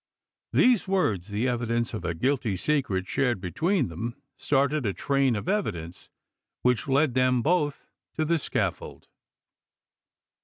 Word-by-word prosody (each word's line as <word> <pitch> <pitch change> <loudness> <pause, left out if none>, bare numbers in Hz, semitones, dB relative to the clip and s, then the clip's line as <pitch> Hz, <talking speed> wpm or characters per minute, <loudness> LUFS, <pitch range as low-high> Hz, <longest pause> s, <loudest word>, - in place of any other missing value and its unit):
These 245 -6 +4
words, 110 - 0
the 105 +4 -1
evidence 120 -2 -1
of - - -4
a 85 -1 -2
guilty 125 - 0
secret 100 -6 0
shared 120 +1 0
between 165 - 0
them, 115 +9 -5 0.2
started 140 +1 +1
a 100 -4 0
train 135 0 +1
of 105 - -5
evidence 95 - -3 0.5
which 125 0 +2
led 140 0 +2
them 130 -1 +2
both 150 -3 0 0.3
to 155 - 0
the 165 +1 +1
scaffold. - - -3
130 Hz, 130 wpm, -26 LUFS, 105-150 Hz, 0.5 s, These